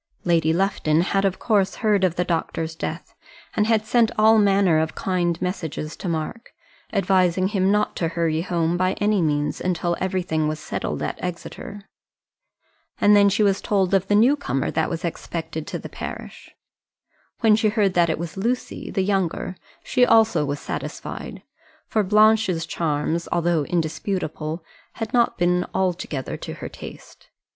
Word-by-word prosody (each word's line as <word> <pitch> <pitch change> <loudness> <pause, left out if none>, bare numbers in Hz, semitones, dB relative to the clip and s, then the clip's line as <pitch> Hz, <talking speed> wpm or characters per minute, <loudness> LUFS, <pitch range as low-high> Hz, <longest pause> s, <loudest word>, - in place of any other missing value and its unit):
Lady 165 -2 +2
Lufton 170 -3 +1
had 195 +2 +1
of 190 -1 0
course 205 -4 +1
heard 205 -3 +3
of 180 -3 +2
the 180 - +1
doctor's 165 -1 -2
death, 160 - -6 0.4
and 210 - +2
had 220 -1 +2
sent 230 0 +3
all 220 +1 +6
manner 195 -5 +4
of 160 0 -2
kind 175 -3 -1
messages 160 -4 -4
to 185 - -5
Mark, 165 +9 -4 0.4
advising 185 -2 +2
him 195 -2 +2
not 210 0 +1
to 165 - 0
hurry 165 -1 0
home 170 -1 0
by 185 +1 +1
any 210 -2 +1
means 150 -2 0
until 175 -1 0
everything 180 -4 -1
was 155 0 -3
settled - - -4
at - - -4
Exeter. 200 +4 -6 1.1
And 205 0 +6
then 200 0 +6
she 205 +2 +2
was 200 -1 +2
told 195 -2 +1
of 190 -1 +2
the 205 - +3
new 240 +7 +5
comer 210 - -2
that 160 - 0
was 170 +2 -3
expected 160 -2 -5
in - - -4
the - - -7
parish. - - -8 0.9
When 220 -2 +5
she 220 0 +2
heard 205 -3 +1
that 175 -1 +3
it 160 - 0
was 170 0 -6
Lucy, 235 +6 -3
the 190 - 0
younger, 190 -2 -1 0.3
she 250 - +2
also 225 -8 +4
was 145 0 -3
satisfied; - - -6 0.4
for 220 - +1
Blanche's 210 -4 +3
charms, 160 +1 -1
though 170 -3 +1
indisputable, 160 -1 -2 0.3
had 225 -2 -5
not 240 -1 +2
been 180 0 +2
altogether 175 -7 -2
to - - -7
her - - -7
taste. - - -12
185 Hz, 165 wpm, -23 LUFS, 165-205 Hz, 1.1 s, all